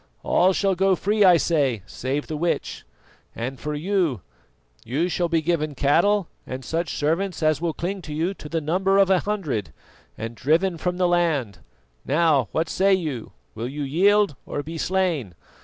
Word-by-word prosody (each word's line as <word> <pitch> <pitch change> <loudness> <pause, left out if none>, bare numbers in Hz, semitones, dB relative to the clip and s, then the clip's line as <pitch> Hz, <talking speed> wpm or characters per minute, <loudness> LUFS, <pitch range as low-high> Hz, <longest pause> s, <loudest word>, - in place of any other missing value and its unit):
All 185 +2 +3
shall 195 +1 +1
go 190 +1 +3
free, 210 +3 +1
I 180 -3 +7
say, 140 - +1
save 135 +7 -3
the 155 - -5
witch; 170 +3 -2 0.5
and 125 +3 -5
for 150 0 -4
you, 165 - 0 0.6
you 145 +9 -1
shall 175 -1 0
be 165 -1 +1
given 155 -3 -1
cattle 170 +8 +2 0.2
and 130 0 -6
such 165 0 -2
servants 165 +4 -1
as 155 -1 +2
will 170 -2 -1
cling 190 +3 -3
to 155 -3 -7
you 170 +5 0
to 150 - -11
the 165 0 -1
number 190 +6 +1
of 195 -1 +4
a 185 - +5
hundred, 150 - -3 0.5
and 115 +1 -5
driven 165 - +1
from 180 +1 -2
the 180 -1 +2
land. 160 - 0 0.4
Now, 150 -5 +2
what 160 +1 0
say 195 +4 +3
you? 150 -11 -4 0.2
Will 115 +3 -4
you 145 +2 -4
yield 195 +4 +3
or 145 - -3
be 165 +3 -6
slain? 170 - -1
165 Hz, 175 wpm, -23 LUFS, 145-185 Hz, 0.6 s, I